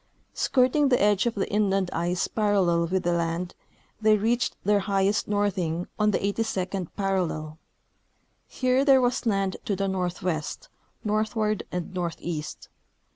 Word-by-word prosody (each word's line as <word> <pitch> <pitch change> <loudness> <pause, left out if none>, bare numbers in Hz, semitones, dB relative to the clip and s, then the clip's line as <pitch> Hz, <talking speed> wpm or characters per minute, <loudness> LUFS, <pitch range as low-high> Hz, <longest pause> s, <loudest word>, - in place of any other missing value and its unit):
Skirting 270 +2 +2
the 250 - +3
edge 205 +2 +3
of 235 - -1
the 195 - -1
inland 195 -3 +1
ice 175 +2 0
parallel 190 -6 +2
with 185 +2 -1
the 175 - +1
land, 170 +1 -2 0.5
they 215 0 +5
reached 235 +4 0
their 205 +1 +3
highest 195 +1 +1
northing 190 -5 -1
on 210 0 +3
the 210 - +2
82d 195 -3 -2
parallel. 175 -6 -2 0.9
Here 255 +1 +1
there 270 -2 +6
was 245 0 0
land 195 -3 0
to 200 - 0
the 195 +1 -1
northwest, 180 - -3 0.4
northward 215 0 0
and 180 0 -4
northeast. 170 -3 -4
195 Hz, 135 wpm, -26 LUFS, 180-215 Hz, 0.9 s, there